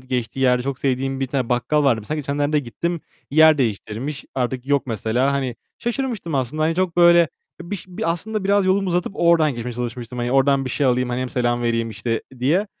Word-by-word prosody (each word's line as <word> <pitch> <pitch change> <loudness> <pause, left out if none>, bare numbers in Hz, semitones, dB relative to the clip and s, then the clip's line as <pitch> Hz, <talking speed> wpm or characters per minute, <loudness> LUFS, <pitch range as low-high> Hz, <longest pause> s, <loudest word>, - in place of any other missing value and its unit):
geçtiği 130 -1 -3
yerde 125 -1 +3
çok 135 0 -3
sevdiğim 135 0 -1
bir 135 - 0
tane 130 -2 -2
bakkal 145 +4 +1
vardı. 120 -5 +3
Mesela 110 +9 -4
geçenlerde 145 +1 0
gittim. 165 +6 -3 0.3
Yer 155 +1 +6
değiştirmiş. 120 +4 -2
Artık 130 0 -2
yok 140 -1 +1
mesela. 120 +4 0
Hani 130 -4 -2 0.2
şaşırmıştım 235 - -3
aslında, 135 +4 -1
hani 160 +1 +2
çok 185 -1 -1
böyle 170 -2 +6 0.3
biş 180 +2 -6
bir 175 -2 -2
aslında 210 +4 -4
biraz 200 0 +3
yolumu 190 0 +2
uzatıp 175 +2 -1
oradan 165 -4 +3
girmeye 120 +1 -5
çalışmıştım. 120 0 -5
Hani 120 +1 -1
oradan 135 0 +3
bir 130 - -4
şey 145 - +1
alayım, 125 0 +2
hani 125 +1 -2
hem 130 - -2
selam 120 0 0
vereyim 115 -1 0
işte 115 +2 -2 0.2
diye. 160 +11 +2
135 Hz, 195 wpm, -21 LUFS, 125-165 Hz, 0.3 s, Yer